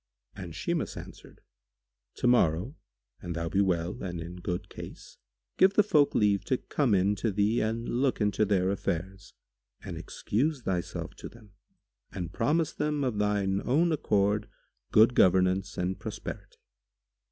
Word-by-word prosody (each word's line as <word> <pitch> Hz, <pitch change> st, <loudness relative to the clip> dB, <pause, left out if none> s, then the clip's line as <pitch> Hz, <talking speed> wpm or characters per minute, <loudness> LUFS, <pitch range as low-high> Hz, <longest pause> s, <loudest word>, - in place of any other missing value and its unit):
And 90 Hz, -5 st, -8 dB
Shimas 170 Hz, -, -2 dB
answered, -, -, -11 dB, 0.7 s
"Tomorrow, 115 Hz, -, +2 dB, 0.5 s
an 85 Hz, -, -5 dB
thou 85 Hz, 0 st, -3 dB
be 100 Hz, -, +2 dB
well 90 Hz, -1 st, -1 dB
and 90 Hz, -3 st, -4 dB
in 85 Hz, +2 st, -7 dB
good 90 Hz, 0 st, -4 dB
case,[FN#147] -, -, -13 dB
give 190 Hz, +1 st, +6 dB
the 210 Hz, -, +6 dB
folk 150 Hz, -8 st, +3 dB
leave 100 Hz, -2 st, +3 dB
to 130 Hz, -, +1 dB
come 125 Hz, -6 st, 0 dB
in 95 Hz, +2 st, +3 dB
to 110 Hz, +4 st, 0 dB
thee 105 Hz, +4 st, +1 dB
and 115 Hz, +2 st, -2 dB
look 130 Hz, +2 st, 0 dB
into 105 Hz, -1 st, +1 dB
their 95 Hz, -2 st, +2 dB
affairs 95 Hz, 0 st, -4 dB, 0.5 s
and -, -, -6 dB
excuse 135 Hz, +5 st, -2 dB
thyself 90 Hz, -4 st, -3 dB
to -, -, -8 dB
them 110 Hz, -3 st, -17 dB, 0.6 s
and 90 Hz, -1 st, -5 dB
promise 150 Hz, +6 st, +1 dB
them 150 Hz, -1 st, -1 dB
of 120 Hz, -6 st, -1 dB
thine 100 Hz, -2 st, +1 dB
own 165 Hz, +7 st, +2 dB
accord 105 Hz, -7 st, +1 dB, 0.4 s
good 110 Hz, +3 st, +6 dB
governance 95 Hz, 0 st, +3 dB
and 90 Hz, +1 st, -2 dB
prosperity." -, -, -7 dB
100 Hz, 145 wpm, -29 LUFS, 90-120 Hz, 0.7 s, give